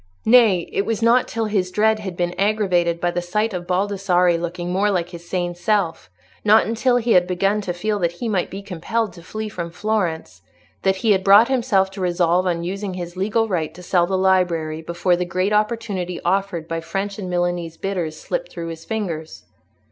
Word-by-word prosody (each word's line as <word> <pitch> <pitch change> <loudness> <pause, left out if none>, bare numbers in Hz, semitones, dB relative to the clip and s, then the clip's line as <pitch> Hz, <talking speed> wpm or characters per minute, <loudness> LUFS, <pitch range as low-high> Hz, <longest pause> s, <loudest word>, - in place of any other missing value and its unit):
Nay, 220 -7 +5
it 195 - +1
was 225 +1 -2
not 240 +2 +4
till 225 0 -2
his 200 -4 0
dread 215 +3 +2
had 190 -4 -6
been 175 0 -1
aggravated 185 -5 +1
by 175 0 0
the 175 - -2
sight 210 +5 -1
of 175 -1 -5
Baldassarre 185 -2 +2
looking 175 +1 -4
more 200 +3 +2
like 175 -3 -1
his 170 -1 -11
sane 175 -1 -1
self, 175 - -1 0.3
not 215 +1 +5
until 235 +3 +1
he 240 -1 0
had 180 -3 +5
begun 195 +3 +1
to 185 - -3
feel 205 +4 -2
that 170 -2 0
he 230 +7 -5
might 195 -5 0
be 195 +1 -7
compelled 200 +3 -2
to 170 - -12
flee 215 +5 -5
from 170 -5 -5
Florence, 170 - -2 0.4
that 190 0 +2
he 220 - +5
had 190 -2 +3
brought 205 +5 +7
himself 230 -7 +2
to 195 0 -7
resolve 180 0 +2
on 170 -1 -1
using 195 +1 -4
his 175 -1 -6
legal 215 +4 0
right 160 -5 -2
to 180 - -11
sell 175 -1 +2
the 190 0 0
library 175 -4 +1
before 170 +2 0
the 180 - -1
great 185 +3 -1
opportunity 210 -5 -1
offered 180 -3 0
by 165 0 -2
French 195 +5 -4
and 185 -3 -5
Milanese 175 -2 -1
bidders 175 -5 -3
slipped - - -3
through 165 0 -6
his 165 0 -8
fingers. 170 -8 -4
185 Hz, 200 wpm, -21 LUFS, 175-210 Hz, 0.4 s, brought